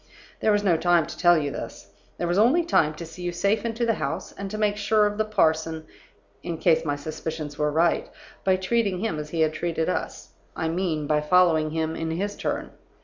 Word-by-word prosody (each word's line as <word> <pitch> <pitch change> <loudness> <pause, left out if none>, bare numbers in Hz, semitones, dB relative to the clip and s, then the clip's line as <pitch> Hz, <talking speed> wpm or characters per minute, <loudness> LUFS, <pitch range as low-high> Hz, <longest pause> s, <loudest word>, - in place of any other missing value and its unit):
There 215 - +2
was 205 0 +2
no 175 -5 +3
time 175 -1 +3
to - - -8
tell 175 -1 +5
you 145 -2 -1
this. - - -8 0.3
There 175 - -2
was 175 +3 +1
only 265 +11 +4
time 155 - +2
to 170 - -7
see 165 +2 -11
you 175 0 -2
safe 200 +5 0
into 230 +1 -1
the 230 - +2
house, - - -4
and 200 0 -7
to 215 - -5
make 210 -1 +1
sure 210 +1 +2
of 205 +1 -2
the 215 - +2
parson 160 -5 +1 0.6
(in 170 -2 -4
case 160 - +3
my 145 -3 -1
suspicions 155 0 -5
were 150 0 +2
right) 165 +3 +1 0.3
by 190 -1 +3
treating 190 0 0
him 215 -9 -2
as 150 0 -6
he 165 0 -1
had 155 -1 +2
treated 160 0 -1
us; - - -4 0.3
I 160 - -1
mean, 165 -3 -1
by 150 0 +1
following 160 -1 +3
him 160 0 -2
in 165 - -3
his 200 +5 -2
turn. - - -3
170 Hz, 220 wpm, -25 LUFS, 160-205 Hz, 0.6 s, tell